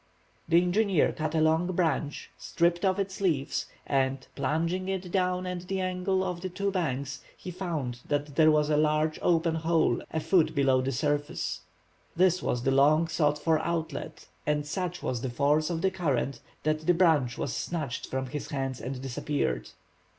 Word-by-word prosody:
The 170 Hz, +1 st, +6 dB
engineer 180 Hz, 0 st, +2 dB
cut 155 Hz, 0 st, -3 dB
a 160 Hz, -, +3 dB
long 160 Hz, +2 st, +3 dB
branch, 160 Hz, -4 st, -1 dB
stripped 170 Hz, +1 st, 0 dB
off 190 Hz, -1 st, +2 dB
its 195 Hz, 0 st, -3 dB
leaves, 155 Hz, -8 st, 0 dB, 0.2 s
and, 135 Hz, -1 st, 0 dB
plunging 170 Hz, +4 st, -1 dB
it 190 Hz, -2 st, -3 dB
down 180 Hz, -1 st, +1 dB
at 180 Hz, -1 st, -5 dB
the 195 Hz, 0 st, -1 dB
angle 185 Hz, +1 st, 0 dB
of 180 Hz, -2 st, -3 dB
the 185 Hz, -, -3 dB
two 200 Hz, +2 st, -2 dB
banks, 140 Hz, -6 st, -2 dB, 0.2 s
he 180 Hz, -, -7 dB
found 160 Hz, -10 st, -3 dB
that 145 Hz, -1 st, -2 dB
there 155 Hz, 0 st, +6 dB
was 150 Hz, 0 st, +3 dB
a 150 Hz, -, +3 dB
large 155 Hz, +1 st, +2 dB
open 165 Hz, -1 st, +2 dB
hole 160 Hz, 0 st, +1 dB
a 160 Hz, -, -2 dB
foot 160 Hz, +1 st, +2 dB
below 135 Hz, -2 st, +3 dB
the 130 Hz, +1 st, -1 dB
surface. 145 Hz, +3 st, -1 dB, 0.5 s
This 185 Hz, 0 st, +3 dB
was 120 Hz, -1 st, -1 dB
the 135 Hz, -, +2 dB
long 150 Hz, +4 st, +4 dB
sought 150 Hz, -2 st, +2 dB
for 160 Hz, +1 st, +2 dB
outlet, 160 Hz, -4 st, -4 dB, 0.2 s
and 150 Hz, -1 st, +1 dB
such 180 Hz, +3 st, -3 dB
was 125 Hz, -2 st, -2 dB
the 130 Hz, -, -2 dB
force 145 Hz, +5 st, +2 dB
of 165 Hz, 0 st, -2 dB
the 190 Hz, -, +3 dB
current 140 Hz, -8 st, -1 dB, 0.2 s
that 155 Hz, 0 st, -1 dB
the 175 Hz, -, +5 dB
branch 155 Hz, -9 st, +3 dB
was 140 Hz, -, -2 dB
snatched 155 Hz, -8 st, -3 dB
from 130 Hz, 0 st, -2 dB
his 145 Hz, +3 st, -5 dB
hands 135 Hz, -4 st, -3 dB
and 130 Hz, +2 st, -4 dB
disappeared. 120 Hz, -, -2 dB
155 Hz, 180 wpm, -28 LUFS, 140-180 Hz, 0.5 s, The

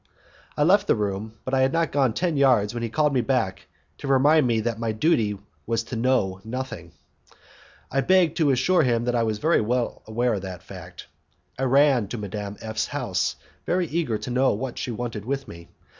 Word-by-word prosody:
I 145 Hz, -, +3 dB
left 200 Hz, +6 st, +4 dB
the -, -, +4 dB
room, 105 Hz, 0 st, -3 dB
but 130 Hz, -, -4 dB
I 135 Hz, -, +3 dB
had 130 Hz, 0 st, +3 dB
not 165 Hz, +1 st, 0 dB
gone 135 Hz, -5 st, +2 dB
ten 170 Hz, +4 st, 0 dB
yards 125 Hz, -7 st, +3 dB
when 120 Hz, -, -4 dB
he 115 Hz, -, -2 dB
called 150 Hz, +4 st, +1 dB
me 130 Hz, -, +2 dB
back 115 Hz, -6 st, -1 dB, 0.3 s
to 140 Hz, -, -6 dB
remind 140 Hz, +2 st, +4 dB
me 115 Hz, -2 st, +1 dB
that 115 Hz, 0 st, -2 dB
my 115 Hz, -1 st, -1 dB
duty 110 Hz, -5 st, +1 dB, 0.3 s
was 115 Hz, 0 st, 0 dB
to 120 Hz, -, -7 dB
know 115 Hz, -6 st, +1 dB
nothing; 110 Hz, -8 st, -6 dB, 1.0 s
I 135 Hz, -, +1 dB
begged 180 Hz, -1 st, +3 dB
to 155 Hz, -4 st, +3 dB
assure 135 Hz, +8 st, +3 dB
him 120 Hz, -2 st, +1 dB
that 125 Hz, -, 0 dB
I 120 Hz, -, +2 dB
was 110 Hz, 0 st, -2 dB
well 125 Hz, -6 st, +1 dB
aware 120 Hz, +2 st, 0 dB
of 100 Hz, -, -2 dB
that. 95 Hz, -2 st, -9 dB, 0.5 s
I -, -, -1 dB
ran 135 Hz, -4 st, +4 dB
to 120 Hz, -, -5 dB
Madame 105 Hz, 0 st, -5 dB
F 110 Hz, 0 st, -5 dB
's -, -, +1 dB
house, 125 Hz, -10 st, -1 dB, 0.3 s
very 180 Hz, 0 st, +1 dB
eager 155 Hz, -8 st, -1 dB
to 125 Hz, -, -6 dB
know 130 Hz, +2 st, +3 dB
what 125 Hz, +4 st, -4 dB
she -, -, -3 dB
wanted 115 Hz, -2 st, -4 dB
with 135 Hz, +3 st, -3 dB
me. 85 Hz, 0 st, -11 dB
125 Hz, 205 wpm, -24 LUFS, 110-140 Hz, 1.0 s, left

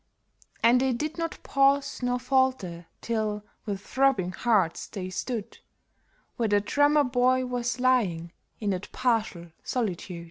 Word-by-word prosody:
And 245 Hz, +2 st, +5 dB
they 265 Hz, -1 st, +2 dB
did 305 Hz, +7 st, -3 dB
not 330 Hz, -1 st, -3 dB
pause 275 Hz, 0 st, +2 dB
nor 245 Hz, 0 st, 0 dB
falter 250 Hz, -10 st, 0 dB
till, 215 Hz, -2 st, -2 dB, 0.2 s
with 200 Hz, -2 st, -3 dB
throbbing 260 Hz, -7 st, +1 dB
hearts, 195 Hz, -4 st, +1 dB
they 185 Hz, -2 st, -6 dB
stood 225 Hz, +3 st, -4 dB, 0.8 s
Where 230 Hz, -2 st, 0 dB
the 205 Hz, 0 st, +4 dB
Drummer 290 Hz, +7 st, +3 dB
Boy 255 Hz, 0 st, +2 dB
was 245 Hz, 0 st, -2 dB
lying 200 Hz, -10 st, +1 dB, 0.3 s
in 210 Hz, -2 st, -1 dB
that 185 Hz, +1 st, -4 dB
partial 215 Hz, -9 st, -1 dB
solitude. 190 Hz, -7 st, -3 dB
235 Hz, 135 wpm, -27 LUFS, 200-255 Hz, 0.8 s, And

